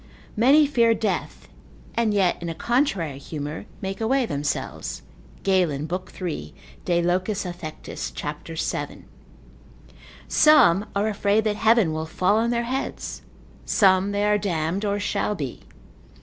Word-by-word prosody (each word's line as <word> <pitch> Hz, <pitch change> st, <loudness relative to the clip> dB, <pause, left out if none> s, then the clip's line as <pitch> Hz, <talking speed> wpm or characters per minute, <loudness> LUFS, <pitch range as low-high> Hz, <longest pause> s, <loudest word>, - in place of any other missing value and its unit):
Many 275 Hz, +7 st, +6 dB
fear 235 Hz, -5 st, +3 dB
death, 220 Hz, 0 st, -3 dB, 0.5 s
and 230 Hz, -2 st, +1 dB
yet 195 Hz, -5 st, +1 dB
in 170 Hz, -, -4 dB
a 165 Hz, -, -4 dB
contrary 195 Hz, -, 0 dB
humour, 150 Hz, +5 st, -6 dB, 0.2 s
make 195 Hz, +3 st, -4 dB
away 255 Hz, +3 st, +2 dB
themselves, 145 Hz, -5 st, -3 dB, 0.4 s
Galen, 170 Hz, -7 st, +1 dB
lib. 180 Hz, +3 st, -4 dB
3. 160 Hz, -, -5 dB, 0.3 s
de 175 Hz, -1 st, +2 dB
loc. 180 Hz, +3 st, +1 dB
affec. 180 Hz, -6 st, -5 dB, 0.3 s
cap. 150 Hz, 0 st, -5 dB
7. 160 Hz, -, -4 dB, 1.2 s
Some 240 Hz, -, +5 dB
are 200 Hz, +2 st, +1 dB
afraid 210 Hz, 0 st, +1 dB
that 210 Hz, -1 st, 0 dB
heaven 220 Hz, -7 st, +4 dB
will 160 Hz, 0 st, -3 dB
fall 185 Hz, +5 st, +2 dB
on 230 Hz, +1 st, +1 dB
their 235 Hz, 0 st, 0 dB
heads: 260 Hz, +3 st, -4 dB, 0.4 s
some 190 Hz, 0 st, +3 dB
they 205 Hz, 0 st, 0 dB
are 210 Hz, 0 st, +3 dB
damned, 175 Hz, 0 st, -1 dB
or 205 Hz, -1 st, 0 dB
shall 205 Hz, +1 st, -1 dB
be. 140 Hz, -8 st, -5 dB
195 Hz, 135 wpm, -24 LUFS, 165-220 Hz, 1.2 s, Many